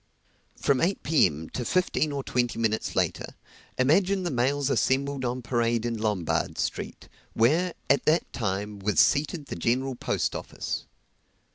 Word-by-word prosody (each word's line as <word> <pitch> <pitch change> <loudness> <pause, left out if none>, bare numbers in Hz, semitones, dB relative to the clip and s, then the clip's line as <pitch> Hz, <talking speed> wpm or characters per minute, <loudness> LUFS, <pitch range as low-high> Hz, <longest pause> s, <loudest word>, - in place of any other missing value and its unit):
From 135 -2 +1
eight, 190 +4 0
P.M. 80 - +2
to 125 - -3
fifteen 155 +1 +1
or 140 -1 -3
twenty 120 -2 -1
minutes 110 -1 -1
later, - - -1 0.4
imagine 185 +9 +3
the 175 - -1
mails 135 +2 +1
assembled 135 0 +1
on 125 0 -2
parade 115 -1 0
in 120 -1 -1
Lombard 105 -6 -1
Street, - - -4 0.3
where, 160 +10 +2
at 140 - +3
that 160 +3 +2
time, 105 -2 -3
was 105 +1 0
seated 150 +1 +2
the - - -6
General 130 +9 0
Post 120 - -1
Office. - - -5
130 Hz, 145 wpm, -27 LUFS, 115-145 Hz, 0.4 s, imagine